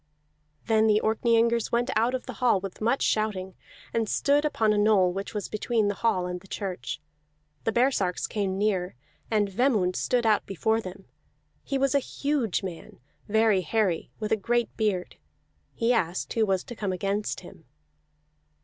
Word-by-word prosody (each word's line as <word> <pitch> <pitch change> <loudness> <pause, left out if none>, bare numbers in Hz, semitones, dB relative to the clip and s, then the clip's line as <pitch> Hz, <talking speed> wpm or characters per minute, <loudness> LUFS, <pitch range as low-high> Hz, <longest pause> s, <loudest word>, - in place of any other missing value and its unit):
Then 220 -1 +3
the 210 -1 +4
Orkneyingers 230 +1 +2
went 240 +1 +1
out 230 +4 +2
of 255 - -5
the 255 - -6
hall 240 -6 +4
with 195 +1 -8
much 235 +5 +1
shouting, 195 -4 0 0.4
and 225 -2 0
stood 290 +1 +2
upon 220 -7 +2
a - - 0
knoll 205 -4 +4
which 195 +3 -5
was 205 - -2
between 215 0 0
the - - 0
hall 185 -6 +2
and 180 0 -4
the 195 - -17
church. 190 -2 -4 0.7
The 225 - +2
baresarks 230 -7 +1
came 195 -3 -2
near, 190 - 0 0.3
and 210 -2 +2
Vemund 195 -3 +1
stood 245 -2 0
out 215 -2 +3
before 220 +4 0
them; 190 0 -9 0.6
he 275 - -1
was 275 -1 +1
a 280 - +4
huge 275 -7 -1
man, 180 -4 -8 0.3
very 220 -2 +3
hairy, 185 0 0
with 215 -1 -3
a - - +5
great 240 +4 0
beard. 205 -5 -1 0.6
He 235 +1 +2
asked 180 -5 -1
who 220 -2 +2
was 190 -1 +1
to 240 - -9
come 205 -3 -2
against 200 +3 -2
him. 165 -3 -14
215 Hz, 170 wpm, -27 LUFS, 190-235 Hz, 0.7 s, a